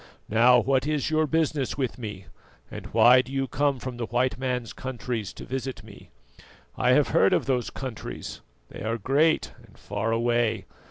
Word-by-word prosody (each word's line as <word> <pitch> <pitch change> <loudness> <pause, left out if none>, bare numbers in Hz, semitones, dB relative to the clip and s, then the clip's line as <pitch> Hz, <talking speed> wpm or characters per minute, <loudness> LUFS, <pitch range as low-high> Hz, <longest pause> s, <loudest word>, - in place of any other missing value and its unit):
Now, 120 +3 +6
what 135 +3 +1
is 150 0 -1
your 155 0 +2
business 155 -4 0
with 130 -3 -2
me, 105 -5 -7 0.5
and - - -7
why 125 +1 +6
do 130 - -12
you 135 -1 -1
come 145 0 0
from 125 -1 -6
the 115 -2 -3
white 125 +2 +1
man's 125 -3 -2
countries 120 -5 -4
to - - -10
visit 130 -4 -5
me? 105 -2 -14 0.7
I - - +3
have - - +3
heard - - +4
of - - +1
those 125 -3 0
countries, 130 -5 -7 0.3
they - - -10
are 115 +2 -1
great 140 +9 +2
and - - -20
far 115 - -3
away. 115 -3 +1
125 Hz, 175 wpm, -26 LUFS, 115-135 Hz, 0.7 s, Now